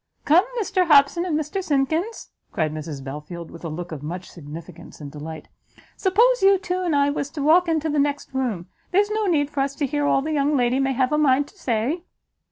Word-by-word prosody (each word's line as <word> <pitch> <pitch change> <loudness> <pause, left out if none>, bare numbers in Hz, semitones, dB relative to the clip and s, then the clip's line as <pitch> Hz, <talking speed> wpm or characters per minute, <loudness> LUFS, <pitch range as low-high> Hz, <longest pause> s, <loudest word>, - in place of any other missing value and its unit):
"Come, 335 +7 +5
Mr 370 -4 +1
Hobson 300 +3 +5
and 315 -4 0
Mr 340 +6 -3
Simkins," 320 - -1 0.2
cried 155 -2 -1
Mrs 150 -3 -6
Belfield, 150 +5 -7
with 170 - -12
a 165 - -4
look 170 +3 -6
of 155 -3 -6
much 175 +5 -6
significance 165 +1 -11
and 145 -2 -8
delight, 155 +2 -8 0.5
"suppose 465 +6 +3
you 390 0 +6
two 370 -1 -3
and 345 -5 0
I 285 0 +3
was 285 -1 -3
to 290 -2 -5
walk 340 +4 +5
into 320 -1 0
the 300 -1 0
next 285 -1 -1
room? 240 -10 -2 0.2
There's 410 +3 +2
no 430 -1 0
need 295 -5 +1
for 280 - -4
us 275 0 0
to 285 - -1
hear 290 +2 -1
all 270 - +2
the 315 - -3
young 290 0 +2
lady 245 +1 +2
may 270 0 +1
have 255 +1 +1
a 300 - +2
mind 285 -1 +3
to - - -23
say." 260 - -1
285 Hz, 220 wpm, -23 LUFS, -, 0.5 s, you